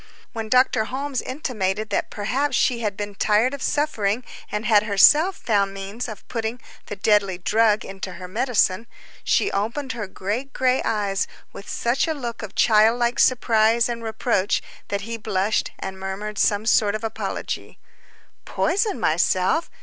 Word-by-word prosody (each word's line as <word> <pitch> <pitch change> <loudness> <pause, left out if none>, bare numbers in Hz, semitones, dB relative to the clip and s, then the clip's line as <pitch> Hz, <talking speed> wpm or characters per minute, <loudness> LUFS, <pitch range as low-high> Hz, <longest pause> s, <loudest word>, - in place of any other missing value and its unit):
When 225 -1 -5
Dr. 250 -3 +3
Holmes 265 +2 -3
intimated 215 -7 -3
that - - -1
perhaps 255 +6 -1
she 240 0 +2
had 210 -3 -2
been 205 0 -4
tired 215 +6 +2
of 280 - -6
suffering, 240 -7 0 0.3
and 210 +2 -3
had 215 -2 +5
herself 295 - +5
found 200 -3 0
means 200 +5 -5
of 215 -4 -9
putting 230 +1 -3 0.3
the 205 - -5
deadly 200 -2 +2
drug 215 +3 +2
into 195 -1 -7
her 185 - -8
medicine, 225 -1 +1 0.4
she - - +2
opened 235 +7 -2
her 220 -4 -5
great 215 +9 -4
gray 255 0 +2
eyes, 205 -3 -1 0.3
with 200 - -10
such 240 +7 0
a 320 - -1
look 240 -5 -5
of 215 -3 -8
child 220 +1 +4
like 240 0 0
surprise 230 -2 +3
and 235 -1 -4
reproach, 220 -3 0 0.2
that 200 0 -2
he 230 +3 -5
blushed, 210 -1 0
and 190 0 -6
murmured 200 +2 -5
some 205 +1 +2
sort 215 -2 +3
of 215 - -5
apology. 225 -1 -4 0.7
"Poison 405 0 0
myself?" 185 - +1
220 Hz, 155 wpm, -23 LUFS, 200-245 Hz, 0.7 s, had